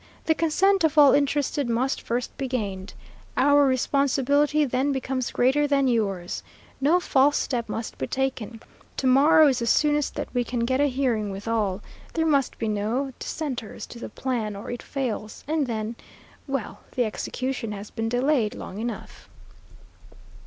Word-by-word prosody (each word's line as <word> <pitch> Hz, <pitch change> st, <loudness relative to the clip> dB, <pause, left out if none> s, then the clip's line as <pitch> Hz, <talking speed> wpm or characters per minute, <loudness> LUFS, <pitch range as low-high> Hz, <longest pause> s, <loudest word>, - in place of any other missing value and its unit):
The 320 Hz, -, +4 dB
consent 360 Hz, +4 st, +2 dB
of 315 Hz, -1 st, +2 dB
all 290 Hz, -2 st, +8 dB
interested 285 Hz, -2 st, +1 dB
must 245 Hz, +3 st, 0 dB
first 240 Hz, +1 st, -3 dB
be 270 Hz, -, -3 dB
gained. 200 Hz, -6 st, -4 dB, 0.4 s
Our 285 Hz, +2 st, +5 dB
responsibility 280 Hz, +3 st, +2 dB
then 265 Hz, +2 st, 0 dB
becomes 260 Hz, -1 st, -2 dB
greater 270 Hz, +4 st, +2 dB
than 275 Hz, -1 st, +2 dB
yours. 195 Hz, -7 st, -1 dB, 0.4 s
No 315 Hz, +6 st, +4 dB
false 285 Hz, -4 st, +3 dB
step 235 Hz, -4 st, -2 dB
must 225 Hz, +1 st, -5 dB
be 130 Hz, -, -2 dB
taken. 255 Hz, -4 st, -3 dB, 0.3 s
To -, -, -2 dB
morrow 290 Hz, +4 st, +6 dB
is 265 Hz, -3 st, +2 dB
the 235 Hz, -, -2 dB
soonest 295 Hz, +4 st, +2 dB
that -, -, -3 dB
we 245 Hz, -1 st, +1 dB
can 240 Hz, 0 st, -3 dB
get 260 Hz, +3 st, +1 dB
a 290 Hz, -, +4 dB
hearing 250 Hz, -6 st, 0 dB
with 195 Hz, +2 st, -7 dB
all. 210 Hz, -4 st, 0 dB, 0.3 s
There 320 Hz, -1 st, +1 dB
must 280 Hz, -5 st, +1 dB
be 225 Hz, -, -2 dB
no 220 Hz, +6 st, -1 dB
dissenters 260 Hz, -9 st, -5 dB
to 235 Hz, -, -11 dB
the -, -, -6 dB
plan 230 Hz, -6 st, -3 dB
or 200 Hz, -, -7 dB
it 245 Hz, -, -5 dB
fails, 235 Hz, -6 st, -4 dB
and 305 Hz, -2 st, 0 dB
then 220 Hz, 0 st, -3 dB, 0.5 s
well, 230 Hz, -7 st, -3 dB, 0.2 s
the 245 Hz, -, +2 dB
execution 255 Hz, +2 st, -3 dB
has 205 Hz, +1 st, -8 dB
been 225 Hz, -1 st, -2 dB
delayed 245 Hz, -2 st, +1 dB
long 195 Hz, -, -7 dB
enough." 235 Hz, +1 st, -6 dB
255 Hz, 165 wpm, -25 LUFS, 225-285 Hz, 0.5 s, all